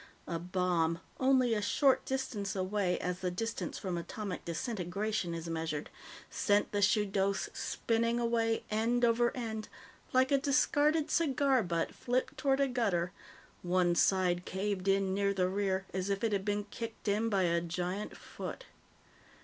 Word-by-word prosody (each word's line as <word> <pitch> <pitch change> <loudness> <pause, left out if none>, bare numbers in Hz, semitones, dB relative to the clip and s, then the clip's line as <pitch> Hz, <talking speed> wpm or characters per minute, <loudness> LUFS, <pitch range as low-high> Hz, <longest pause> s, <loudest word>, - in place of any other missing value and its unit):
A 170 -1 -2
bomb, 175 -2 0 0.2
only 260 -2 +4
a 210 - 0
short 265 +6 +3
distance 240 -7 -2
away 190 -1 0
as 180 0 -3
the 185 - -1
distance 225 +6 -3
from 180 -4 -3
atomic 195 +2 -5
disintegration 185 0 -2
is 165 0 -5
measured, 160 -2 -3 0.4
sent 205 0 +1
the 205 - 0
Shudos 200 -1 +2
spinning 230 +1 0
away, 230 -1 +1
end 235 +3 +2
over 235 +1 +3
end, 220 -3 -4 0.4
like 260 +1 +3
a 280 - +5
discarded 290 +3 +2
cigar 275 -5 +3
butt 170 -4 -1
flipped 255 +1 -1
toward 275 -1 +1
a 275 - +3
gutter, 200 -9 0 0.5
one 175 0 +2
side 180 0 +2
caved 190 0 -2
in 195 -1 +2
near 200 0 +1
the 185 -1 +2
rear, 190 0 0
as 190 +1 -2
if 200 +1 -1
it 225 - +2
had 195 -1 0
been 205 0 0
kicked 230 -1 -6
in 215 +3 +2
by 195 -3 +2
a 170 -1 +2
giant 180 +4 -3
foot. - - -7
205 Hz, 155 wpm, -32 LUFS, 180-235 Hz, 0.5 s, a